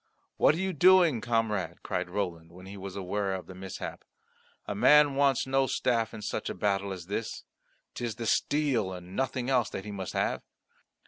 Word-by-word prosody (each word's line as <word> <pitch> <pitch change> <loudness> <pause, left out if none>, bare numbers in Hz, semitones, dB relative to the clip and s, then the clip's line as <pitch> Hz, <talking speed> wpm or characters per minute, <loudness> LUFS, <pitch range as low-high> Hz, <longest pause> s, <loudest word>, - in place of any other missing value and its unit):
"What 150 - +5
are - - -4
you 190 +1 -1
doing, 175 -6 +5
comrade?" 115 -4 -1
cried - - -2
Roland, 90 -4 -3
when 90 +2 -13
he 100 +1 -9
was 95 -1 -7
aware 100 0 -2
of 95 - -6
the 95 - -10
mishap. 95 0 -7 0.6
"A - - -3
man 145 +7 +6
wants 135 -1 +2
no 135 0 +2
staff 115 -4 0
in 110 -2 -8
such - - -3
a - - -4
battle 100 -1 0
as 90 -3 -6
this. 105 +4 -4 0.5
'Tis 120 -3 -4
the 115 - -5
steel 125 -7 +1
and 90 +1 -9
nothing 130 -1 -1
else 125 -5 +2
that 95 - -6
he 105 - -6
must 95 -3 -5
have. - - 0
105 Hz, 190 wpm, -29 LUFS, 95-135 Hz, 0.6 s, man